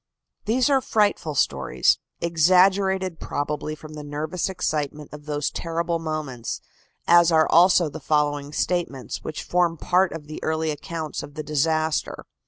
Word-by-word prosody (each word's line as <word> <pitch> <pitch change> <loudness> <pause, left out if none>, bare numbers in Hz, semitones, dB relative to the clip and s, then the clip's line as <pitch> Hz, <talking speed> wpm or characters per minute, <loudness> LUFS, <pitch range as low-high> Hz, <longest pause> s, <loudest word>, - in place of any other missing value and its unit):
These 240 +4 +2
are 275 -2 +3
frightful 205 - +1
stories, 65 - +2 0.2
exaggerated 185 +2 +3
probably 150 +1 -3
from 155 0 -12
the 150 -1 -7
nervous 150 +5 -3
excitement 150 -5 -3
of 150 0 -11
those 145 -1 -1
terrible 170 0 -2
moments, 155 -7 -4 0.5
as 170 0 +6
are 160 -1 +4
also 175 0 +5
the 145 - -7
following 145 -1 0
statements, 160 -6 -2
which 155 - -5
form 175 -2 +1
part 185 +4 +2
of 160 -2 -7
the 155 +1 -8
early 160 0 0
accounts 155 +1 -5
of 145 - -11
the 155 - -4
disaster. 155 +1 0
160 Hz, 145 wpm, -24 LUFS, 150-175 Hz, 0.5 s, as